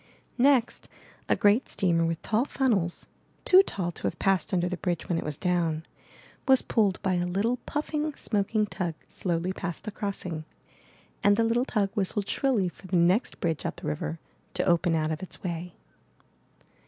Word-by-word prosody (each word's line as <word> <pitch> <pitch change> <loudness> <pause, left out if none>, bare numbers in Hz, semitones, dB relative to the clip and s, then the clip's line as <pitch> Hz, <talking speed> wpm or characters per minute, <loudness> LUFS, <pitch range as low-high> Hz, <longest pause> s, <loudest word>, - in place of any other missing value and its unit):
Next 255 -2 +3 0.4
a - - +5
great 210 +5 +3
steamer 170 -3 +1
with 165 0 -1
tall 225 +2 +2
funnels, 215 - 0 0.4
too 375 0 +8
tall 185 - -3
to - - -10
have 170 - -3
passed 195 -1 +1
under 180 -2 +1
the 180 0 -3
bridge 175 -2 -2
when 170 -2 0
it - - -4
was 150 -1 -4
down, 165 -3 0 0.6
was 265 -1 +6
pulled 205 -5 +1
by 190 - +1
a 175 0 0
little 205 +7 0
puffing, 300 +1 -1
smoking 210 +1 0
tug 175 -5 -3
slowly 175 0 -2
past 180 -2 -5
the 215 - -5
crossing; 185 -6 -4 0.8
and 205 0 +5
the 230 - +3
little 235 +2 +2
tug 205 -6 0
whistled 200 -1 0
shrilly 245 -9 +1
for 180 +2 -10
the 185 - +1
next 180 +7 +2
bridge 165 -4 -1
up - - -4
river 75 +1 -3 0.4
to - - +1
open 170 0 +3
out 155 0 0
of 155 - -3
its 185 - -7
way. 175 -1 -4
185 Hz, 175 wpm, -27 LUFS, 170-215 Hz, 0.8 s, too